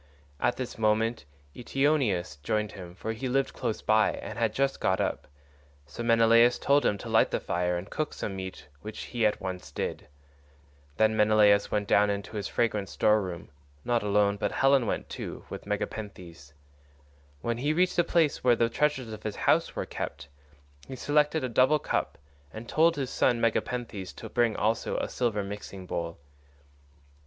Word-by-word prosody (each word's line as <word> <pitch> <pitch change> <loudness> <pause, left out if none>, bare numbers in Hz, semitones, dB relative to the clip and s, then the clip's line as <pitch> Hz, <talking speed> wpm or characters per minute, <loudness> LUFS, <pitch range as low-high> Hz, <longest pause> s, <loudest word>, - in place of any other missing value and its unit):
At 125 - +1
this 125 -3 -5
moment 110 - +1 0.3
Eteoneus 125 - 0
joined 105 +6 -1
him, 90 -3 -10
for 110 +4 -4
he 125 +4 -4
lived 135 +2 0
close 115 -3 -3
by 110 0 +3
and - - -7
had 115 -2 +2
just 135 +4 0
got 95 - +1
up; - - -2 0.6
so 65 - -8
Menelaus 115 +1 +5
told 140 +1 +3
him 100 - +1
to - - -9
light - - +4
the - - -1
fire 90 0 -1
and 90 +3 -6
cook 155 +7 -3
some 100 - -5
meat, 95 -4 -7
which 110 +5 -7
he 115 -3 +1
at 105 - -2
once 95 -1 -6
did. - - -4 0.9
Then 110 0 +3
Menelaus 105 -1 +4
went 105 -1 -1
down 105 0 +4
into 100 +2 -4
his 100 -2 -3
fragrant 105 -4 -1
store 105 0 +3
room,130 90 -3 -7 0.3
not 120 -1 +1
alone, 100 0 +2
but - - -2
Helen 135 -3 +3
went - - -2
too, - - -7
with - - -7
Megapenthes. 95 -8 -5 0.9
When 115 +5 -2
he 145 +4 +1
reached 180 +3 +2
the 175 - +5
place 165 -3 +1
where 125 -1 +5
the 115 0 +2
treasures 130 -3 0
of 110 - -8
his 105 -1 -4
house - - +2
were - - -2
kept, 70 - -6 0.6
he 130 - -6
selected 150 +3 +1
a - - 0
double 130 +5 +4
cup, - - -2 0.3
and 110 +2 -9
told 165 +4 +3
his 135 -2 -3
son 120 - +2
Megapenthes 115 -4 -2
to - - -9
bring 120 -3 +1
also 110 +2 0
a - - -1
silver 110 -5 -1
mixing 100 -1 -7
bowl. 85 -1 -4
110 Hz, 175 wpm, -28 LUFS, 100-125 Hz, 0.9 s, Menelaus